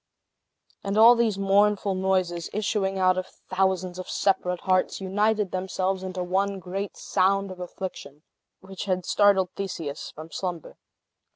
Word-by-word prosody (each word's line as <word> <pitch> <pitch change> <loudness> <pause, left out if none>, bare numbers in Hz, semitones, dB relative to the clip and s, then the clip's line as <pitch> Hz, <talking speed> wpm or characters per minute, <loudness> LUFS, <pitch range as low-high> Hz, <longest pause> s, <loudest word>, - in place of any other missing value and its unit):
And 200 +1 -2
all 230 +2 +9
these 230 -4 +1
mournful 200 0 +2
noises, 185 -3 0
issuing 200 -2 -1
out 185 0 +3
of 185 - -5 0.2
thousands 185 -1 0
of 185 - -7
separate 180 -2 0
hearts, 185 -1 +1
united 205 +1 0
themselves 185 0 -2
into 185 -1 -4
one 195 +2 0
great 190 +2 -5
sound 195 +1 +1
of 185 - -10
affliction, 175 -5 -7 0.4
which 190 +1 -7
had 185 -2 -1
startled 195 -3 +3
Theseus 165 -7 -5
from 160 +2 -11
slumber. 175 -5 -5
190 Hz, 135 wpm, -26 LUFS, 180-195 Hz, 0.4 s, all